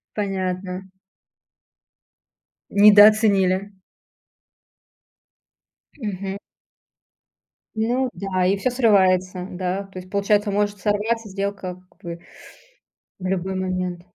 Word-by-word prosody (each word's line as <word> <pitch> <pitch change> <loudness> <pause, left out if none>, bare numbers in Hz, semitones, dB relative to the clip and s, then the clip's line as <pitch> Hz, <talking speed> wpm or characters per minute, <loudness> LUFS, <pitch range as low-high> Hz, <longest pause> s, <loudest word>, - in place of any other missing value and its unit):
Понятно. 190 -2 -3 1.8
Недооценили. 205 -2 +5 2.3
Мгм. 200 -5 -4 1.4
Ну 245 +4 0
да, 185 -2 -1
и 195 +2 +2
всё 255 +5 -1
срывается, 185 -6 +2
да. 185 +2 -3
То 195 -1 -10
есть, 185 0 -12
получается, 205 +1 +1
может 205 0 -1
сорваться 215 +2 -1
сделка 195 -2 -4
как - - -31
бы. 170 -2 -7 1.0
В 185 - -4
любой 190 0 -2
момент. 185 -1 -3
195 Hz, 85 wpm, -22 LUFS, 185-205 Hz, 2.3 s, Недооценили